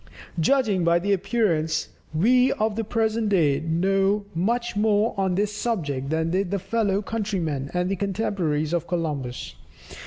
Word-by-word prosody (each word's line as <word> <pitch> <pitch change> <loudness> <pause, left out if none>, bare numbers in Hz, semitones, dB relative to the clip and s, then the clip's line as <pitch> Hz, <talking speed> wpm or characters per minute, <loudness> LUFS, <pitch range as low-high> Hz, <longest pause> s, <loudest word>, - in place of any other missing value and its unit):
Judging 205 - +2
by 170 0 +4
appearances, 185 -4 0 0.2
we 250 +11 +4
of 215 -1 -1
the 225 - -1
present 220 0 0
day 155 -8 +3
know 195 +5 +1
much 235 +8 -1
more 210 +1 +2
on 190 -2 0
this 205 +2 0
subject 145 - -2
than 160 +1 0
did 190 +1 0
the 200 - 0
fellow 205 0 0
countrymen 180 -11 -2
and 180 +1 0
contemporaries 185 -7 -1
of 170 -1 -1
Columbus. 145 -8 -3
195 Hz, 135 wpm, -24 LUFS, 165-215 Hz, 0.2 s, by